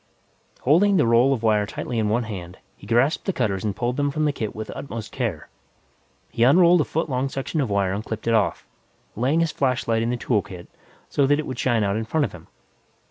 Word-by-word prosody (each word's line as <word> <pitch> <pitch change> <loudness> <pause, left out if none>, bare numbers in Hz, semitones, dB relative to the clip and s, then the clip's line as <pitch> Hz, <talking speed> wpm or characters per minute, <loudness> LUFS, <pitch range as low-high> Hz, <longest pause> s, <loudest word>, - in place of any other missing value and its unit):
Holding 190 +8 +4
the 150 - +3
roll 115 +3 +4
of 125 -4 -1
wire 105 -2 +2
tightly 115 +2 -4
in 105 -1 0
one 120 +3 +1
hand, 95 -5 -7 0.2
he - - -15
grasped 120 +6 +2
the 195 - +1
cutters 100 - -1
and 105 -3 -2
pulled 120 +2 -2
them 145 0 +1
from 155 +2 -1
the 150 - +2
kit 110 -6 -4
with 110 0 -6
utmost 115 -6 -7
care. - - -3 0.8
He - - -4
unrolled 170 +7 +6
a - - 0
foot 165 - -2
long 130 -1 -1
section 135 +4 -3
of 130 - -1
wire 100 -2 +1
and 105 +2 -3
clipped 110 -1 -6
it 115 - +3
off, 110 -3 +1 0.5
laying 135 +9 +1
his 165 -2 +1
flashlight 125 -4 0
in 115 - 0
the 125 - -1
tool 115 -3 +1
kit 90 -2 -11 0.4
so 140 -2 +1
that 145 +1 +3
it 155 - -3
would 130 -4 -6
shine 120 -4 +1
out 100 +1 0
in 110 - -3
front 150 +5 +1
of 110 - -6
him. - - -13
120 Hz, 235 wpm, -23 LUFS, 110-140 Hz, 0.8 s, unrolled